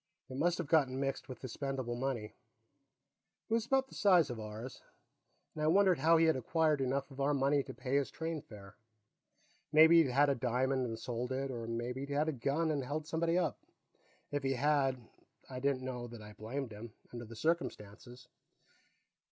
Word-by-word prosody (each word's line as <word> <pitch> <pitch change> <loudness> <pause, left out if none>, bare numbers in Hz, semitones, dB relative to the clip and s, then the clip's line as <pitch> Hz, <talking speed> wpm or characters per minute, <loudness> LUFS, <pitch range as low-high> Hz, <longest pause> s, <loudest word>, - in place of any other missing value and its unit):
It 130 - -6
must 175 +4 +2
have 175 - -3
gotten 140 -4 +2
mixed 135 0 -3
with 130 - -9
his 130 - -6
spendable 135 -4 -3
money 120 -4 -3 1.2
it - - -1
was 230 0 +1
about 265 0 +2
the - - -17
size 180 -9 +4
of 120 - -6
ours 110 +4 -7 0.7
and 155 - -6
I - - +2
wondered 185 +1 +4
how 165 +1 +5
he 165 - +4
had 160 - +4
acquired 155 +3 +1
enough 135 +2 -1
of 135 +1 -6
our 145 +1 +2
money 140 +1 +2
to - - -8
pay 130 +3 -1
his 140 - 0
train 160 -1 -4
fare. 100 -4 -13 1.0
Maybe 160 +2 +8
he'd 145 - +1
had 140 +4 +4
a - - +4
diamond 130 +1 0
and 115 -1 -4
sold 120 +2 -4
it, 135 +1 -2
or 115 -2 -5
maybe 120 +2 -3
he'd 140 0 -5
had 150 +2 +2
a - - -1
gun 145 +6 0
and 145 -3 -1
held 150 +4 -3
somebody 165 +2 0
up. 170 -5 0 0.7
If 145 0 -1
he 135 0 0
had, 135 -3 +1 0.4
I 130 -1 -6
didn't 135 -1 0
know 125 -2 -4
that 120 -1 -10
I 105 0 -11
blamed 120 +4 -5
him, 110 +1 -9 0.2
under 120 0 -6
the 115 +1 -11
circumstances. 125 -6 -3
135 Hz, 195 wpm, -34 LUFS, 125-155 Hz, 1.2 s, Maybe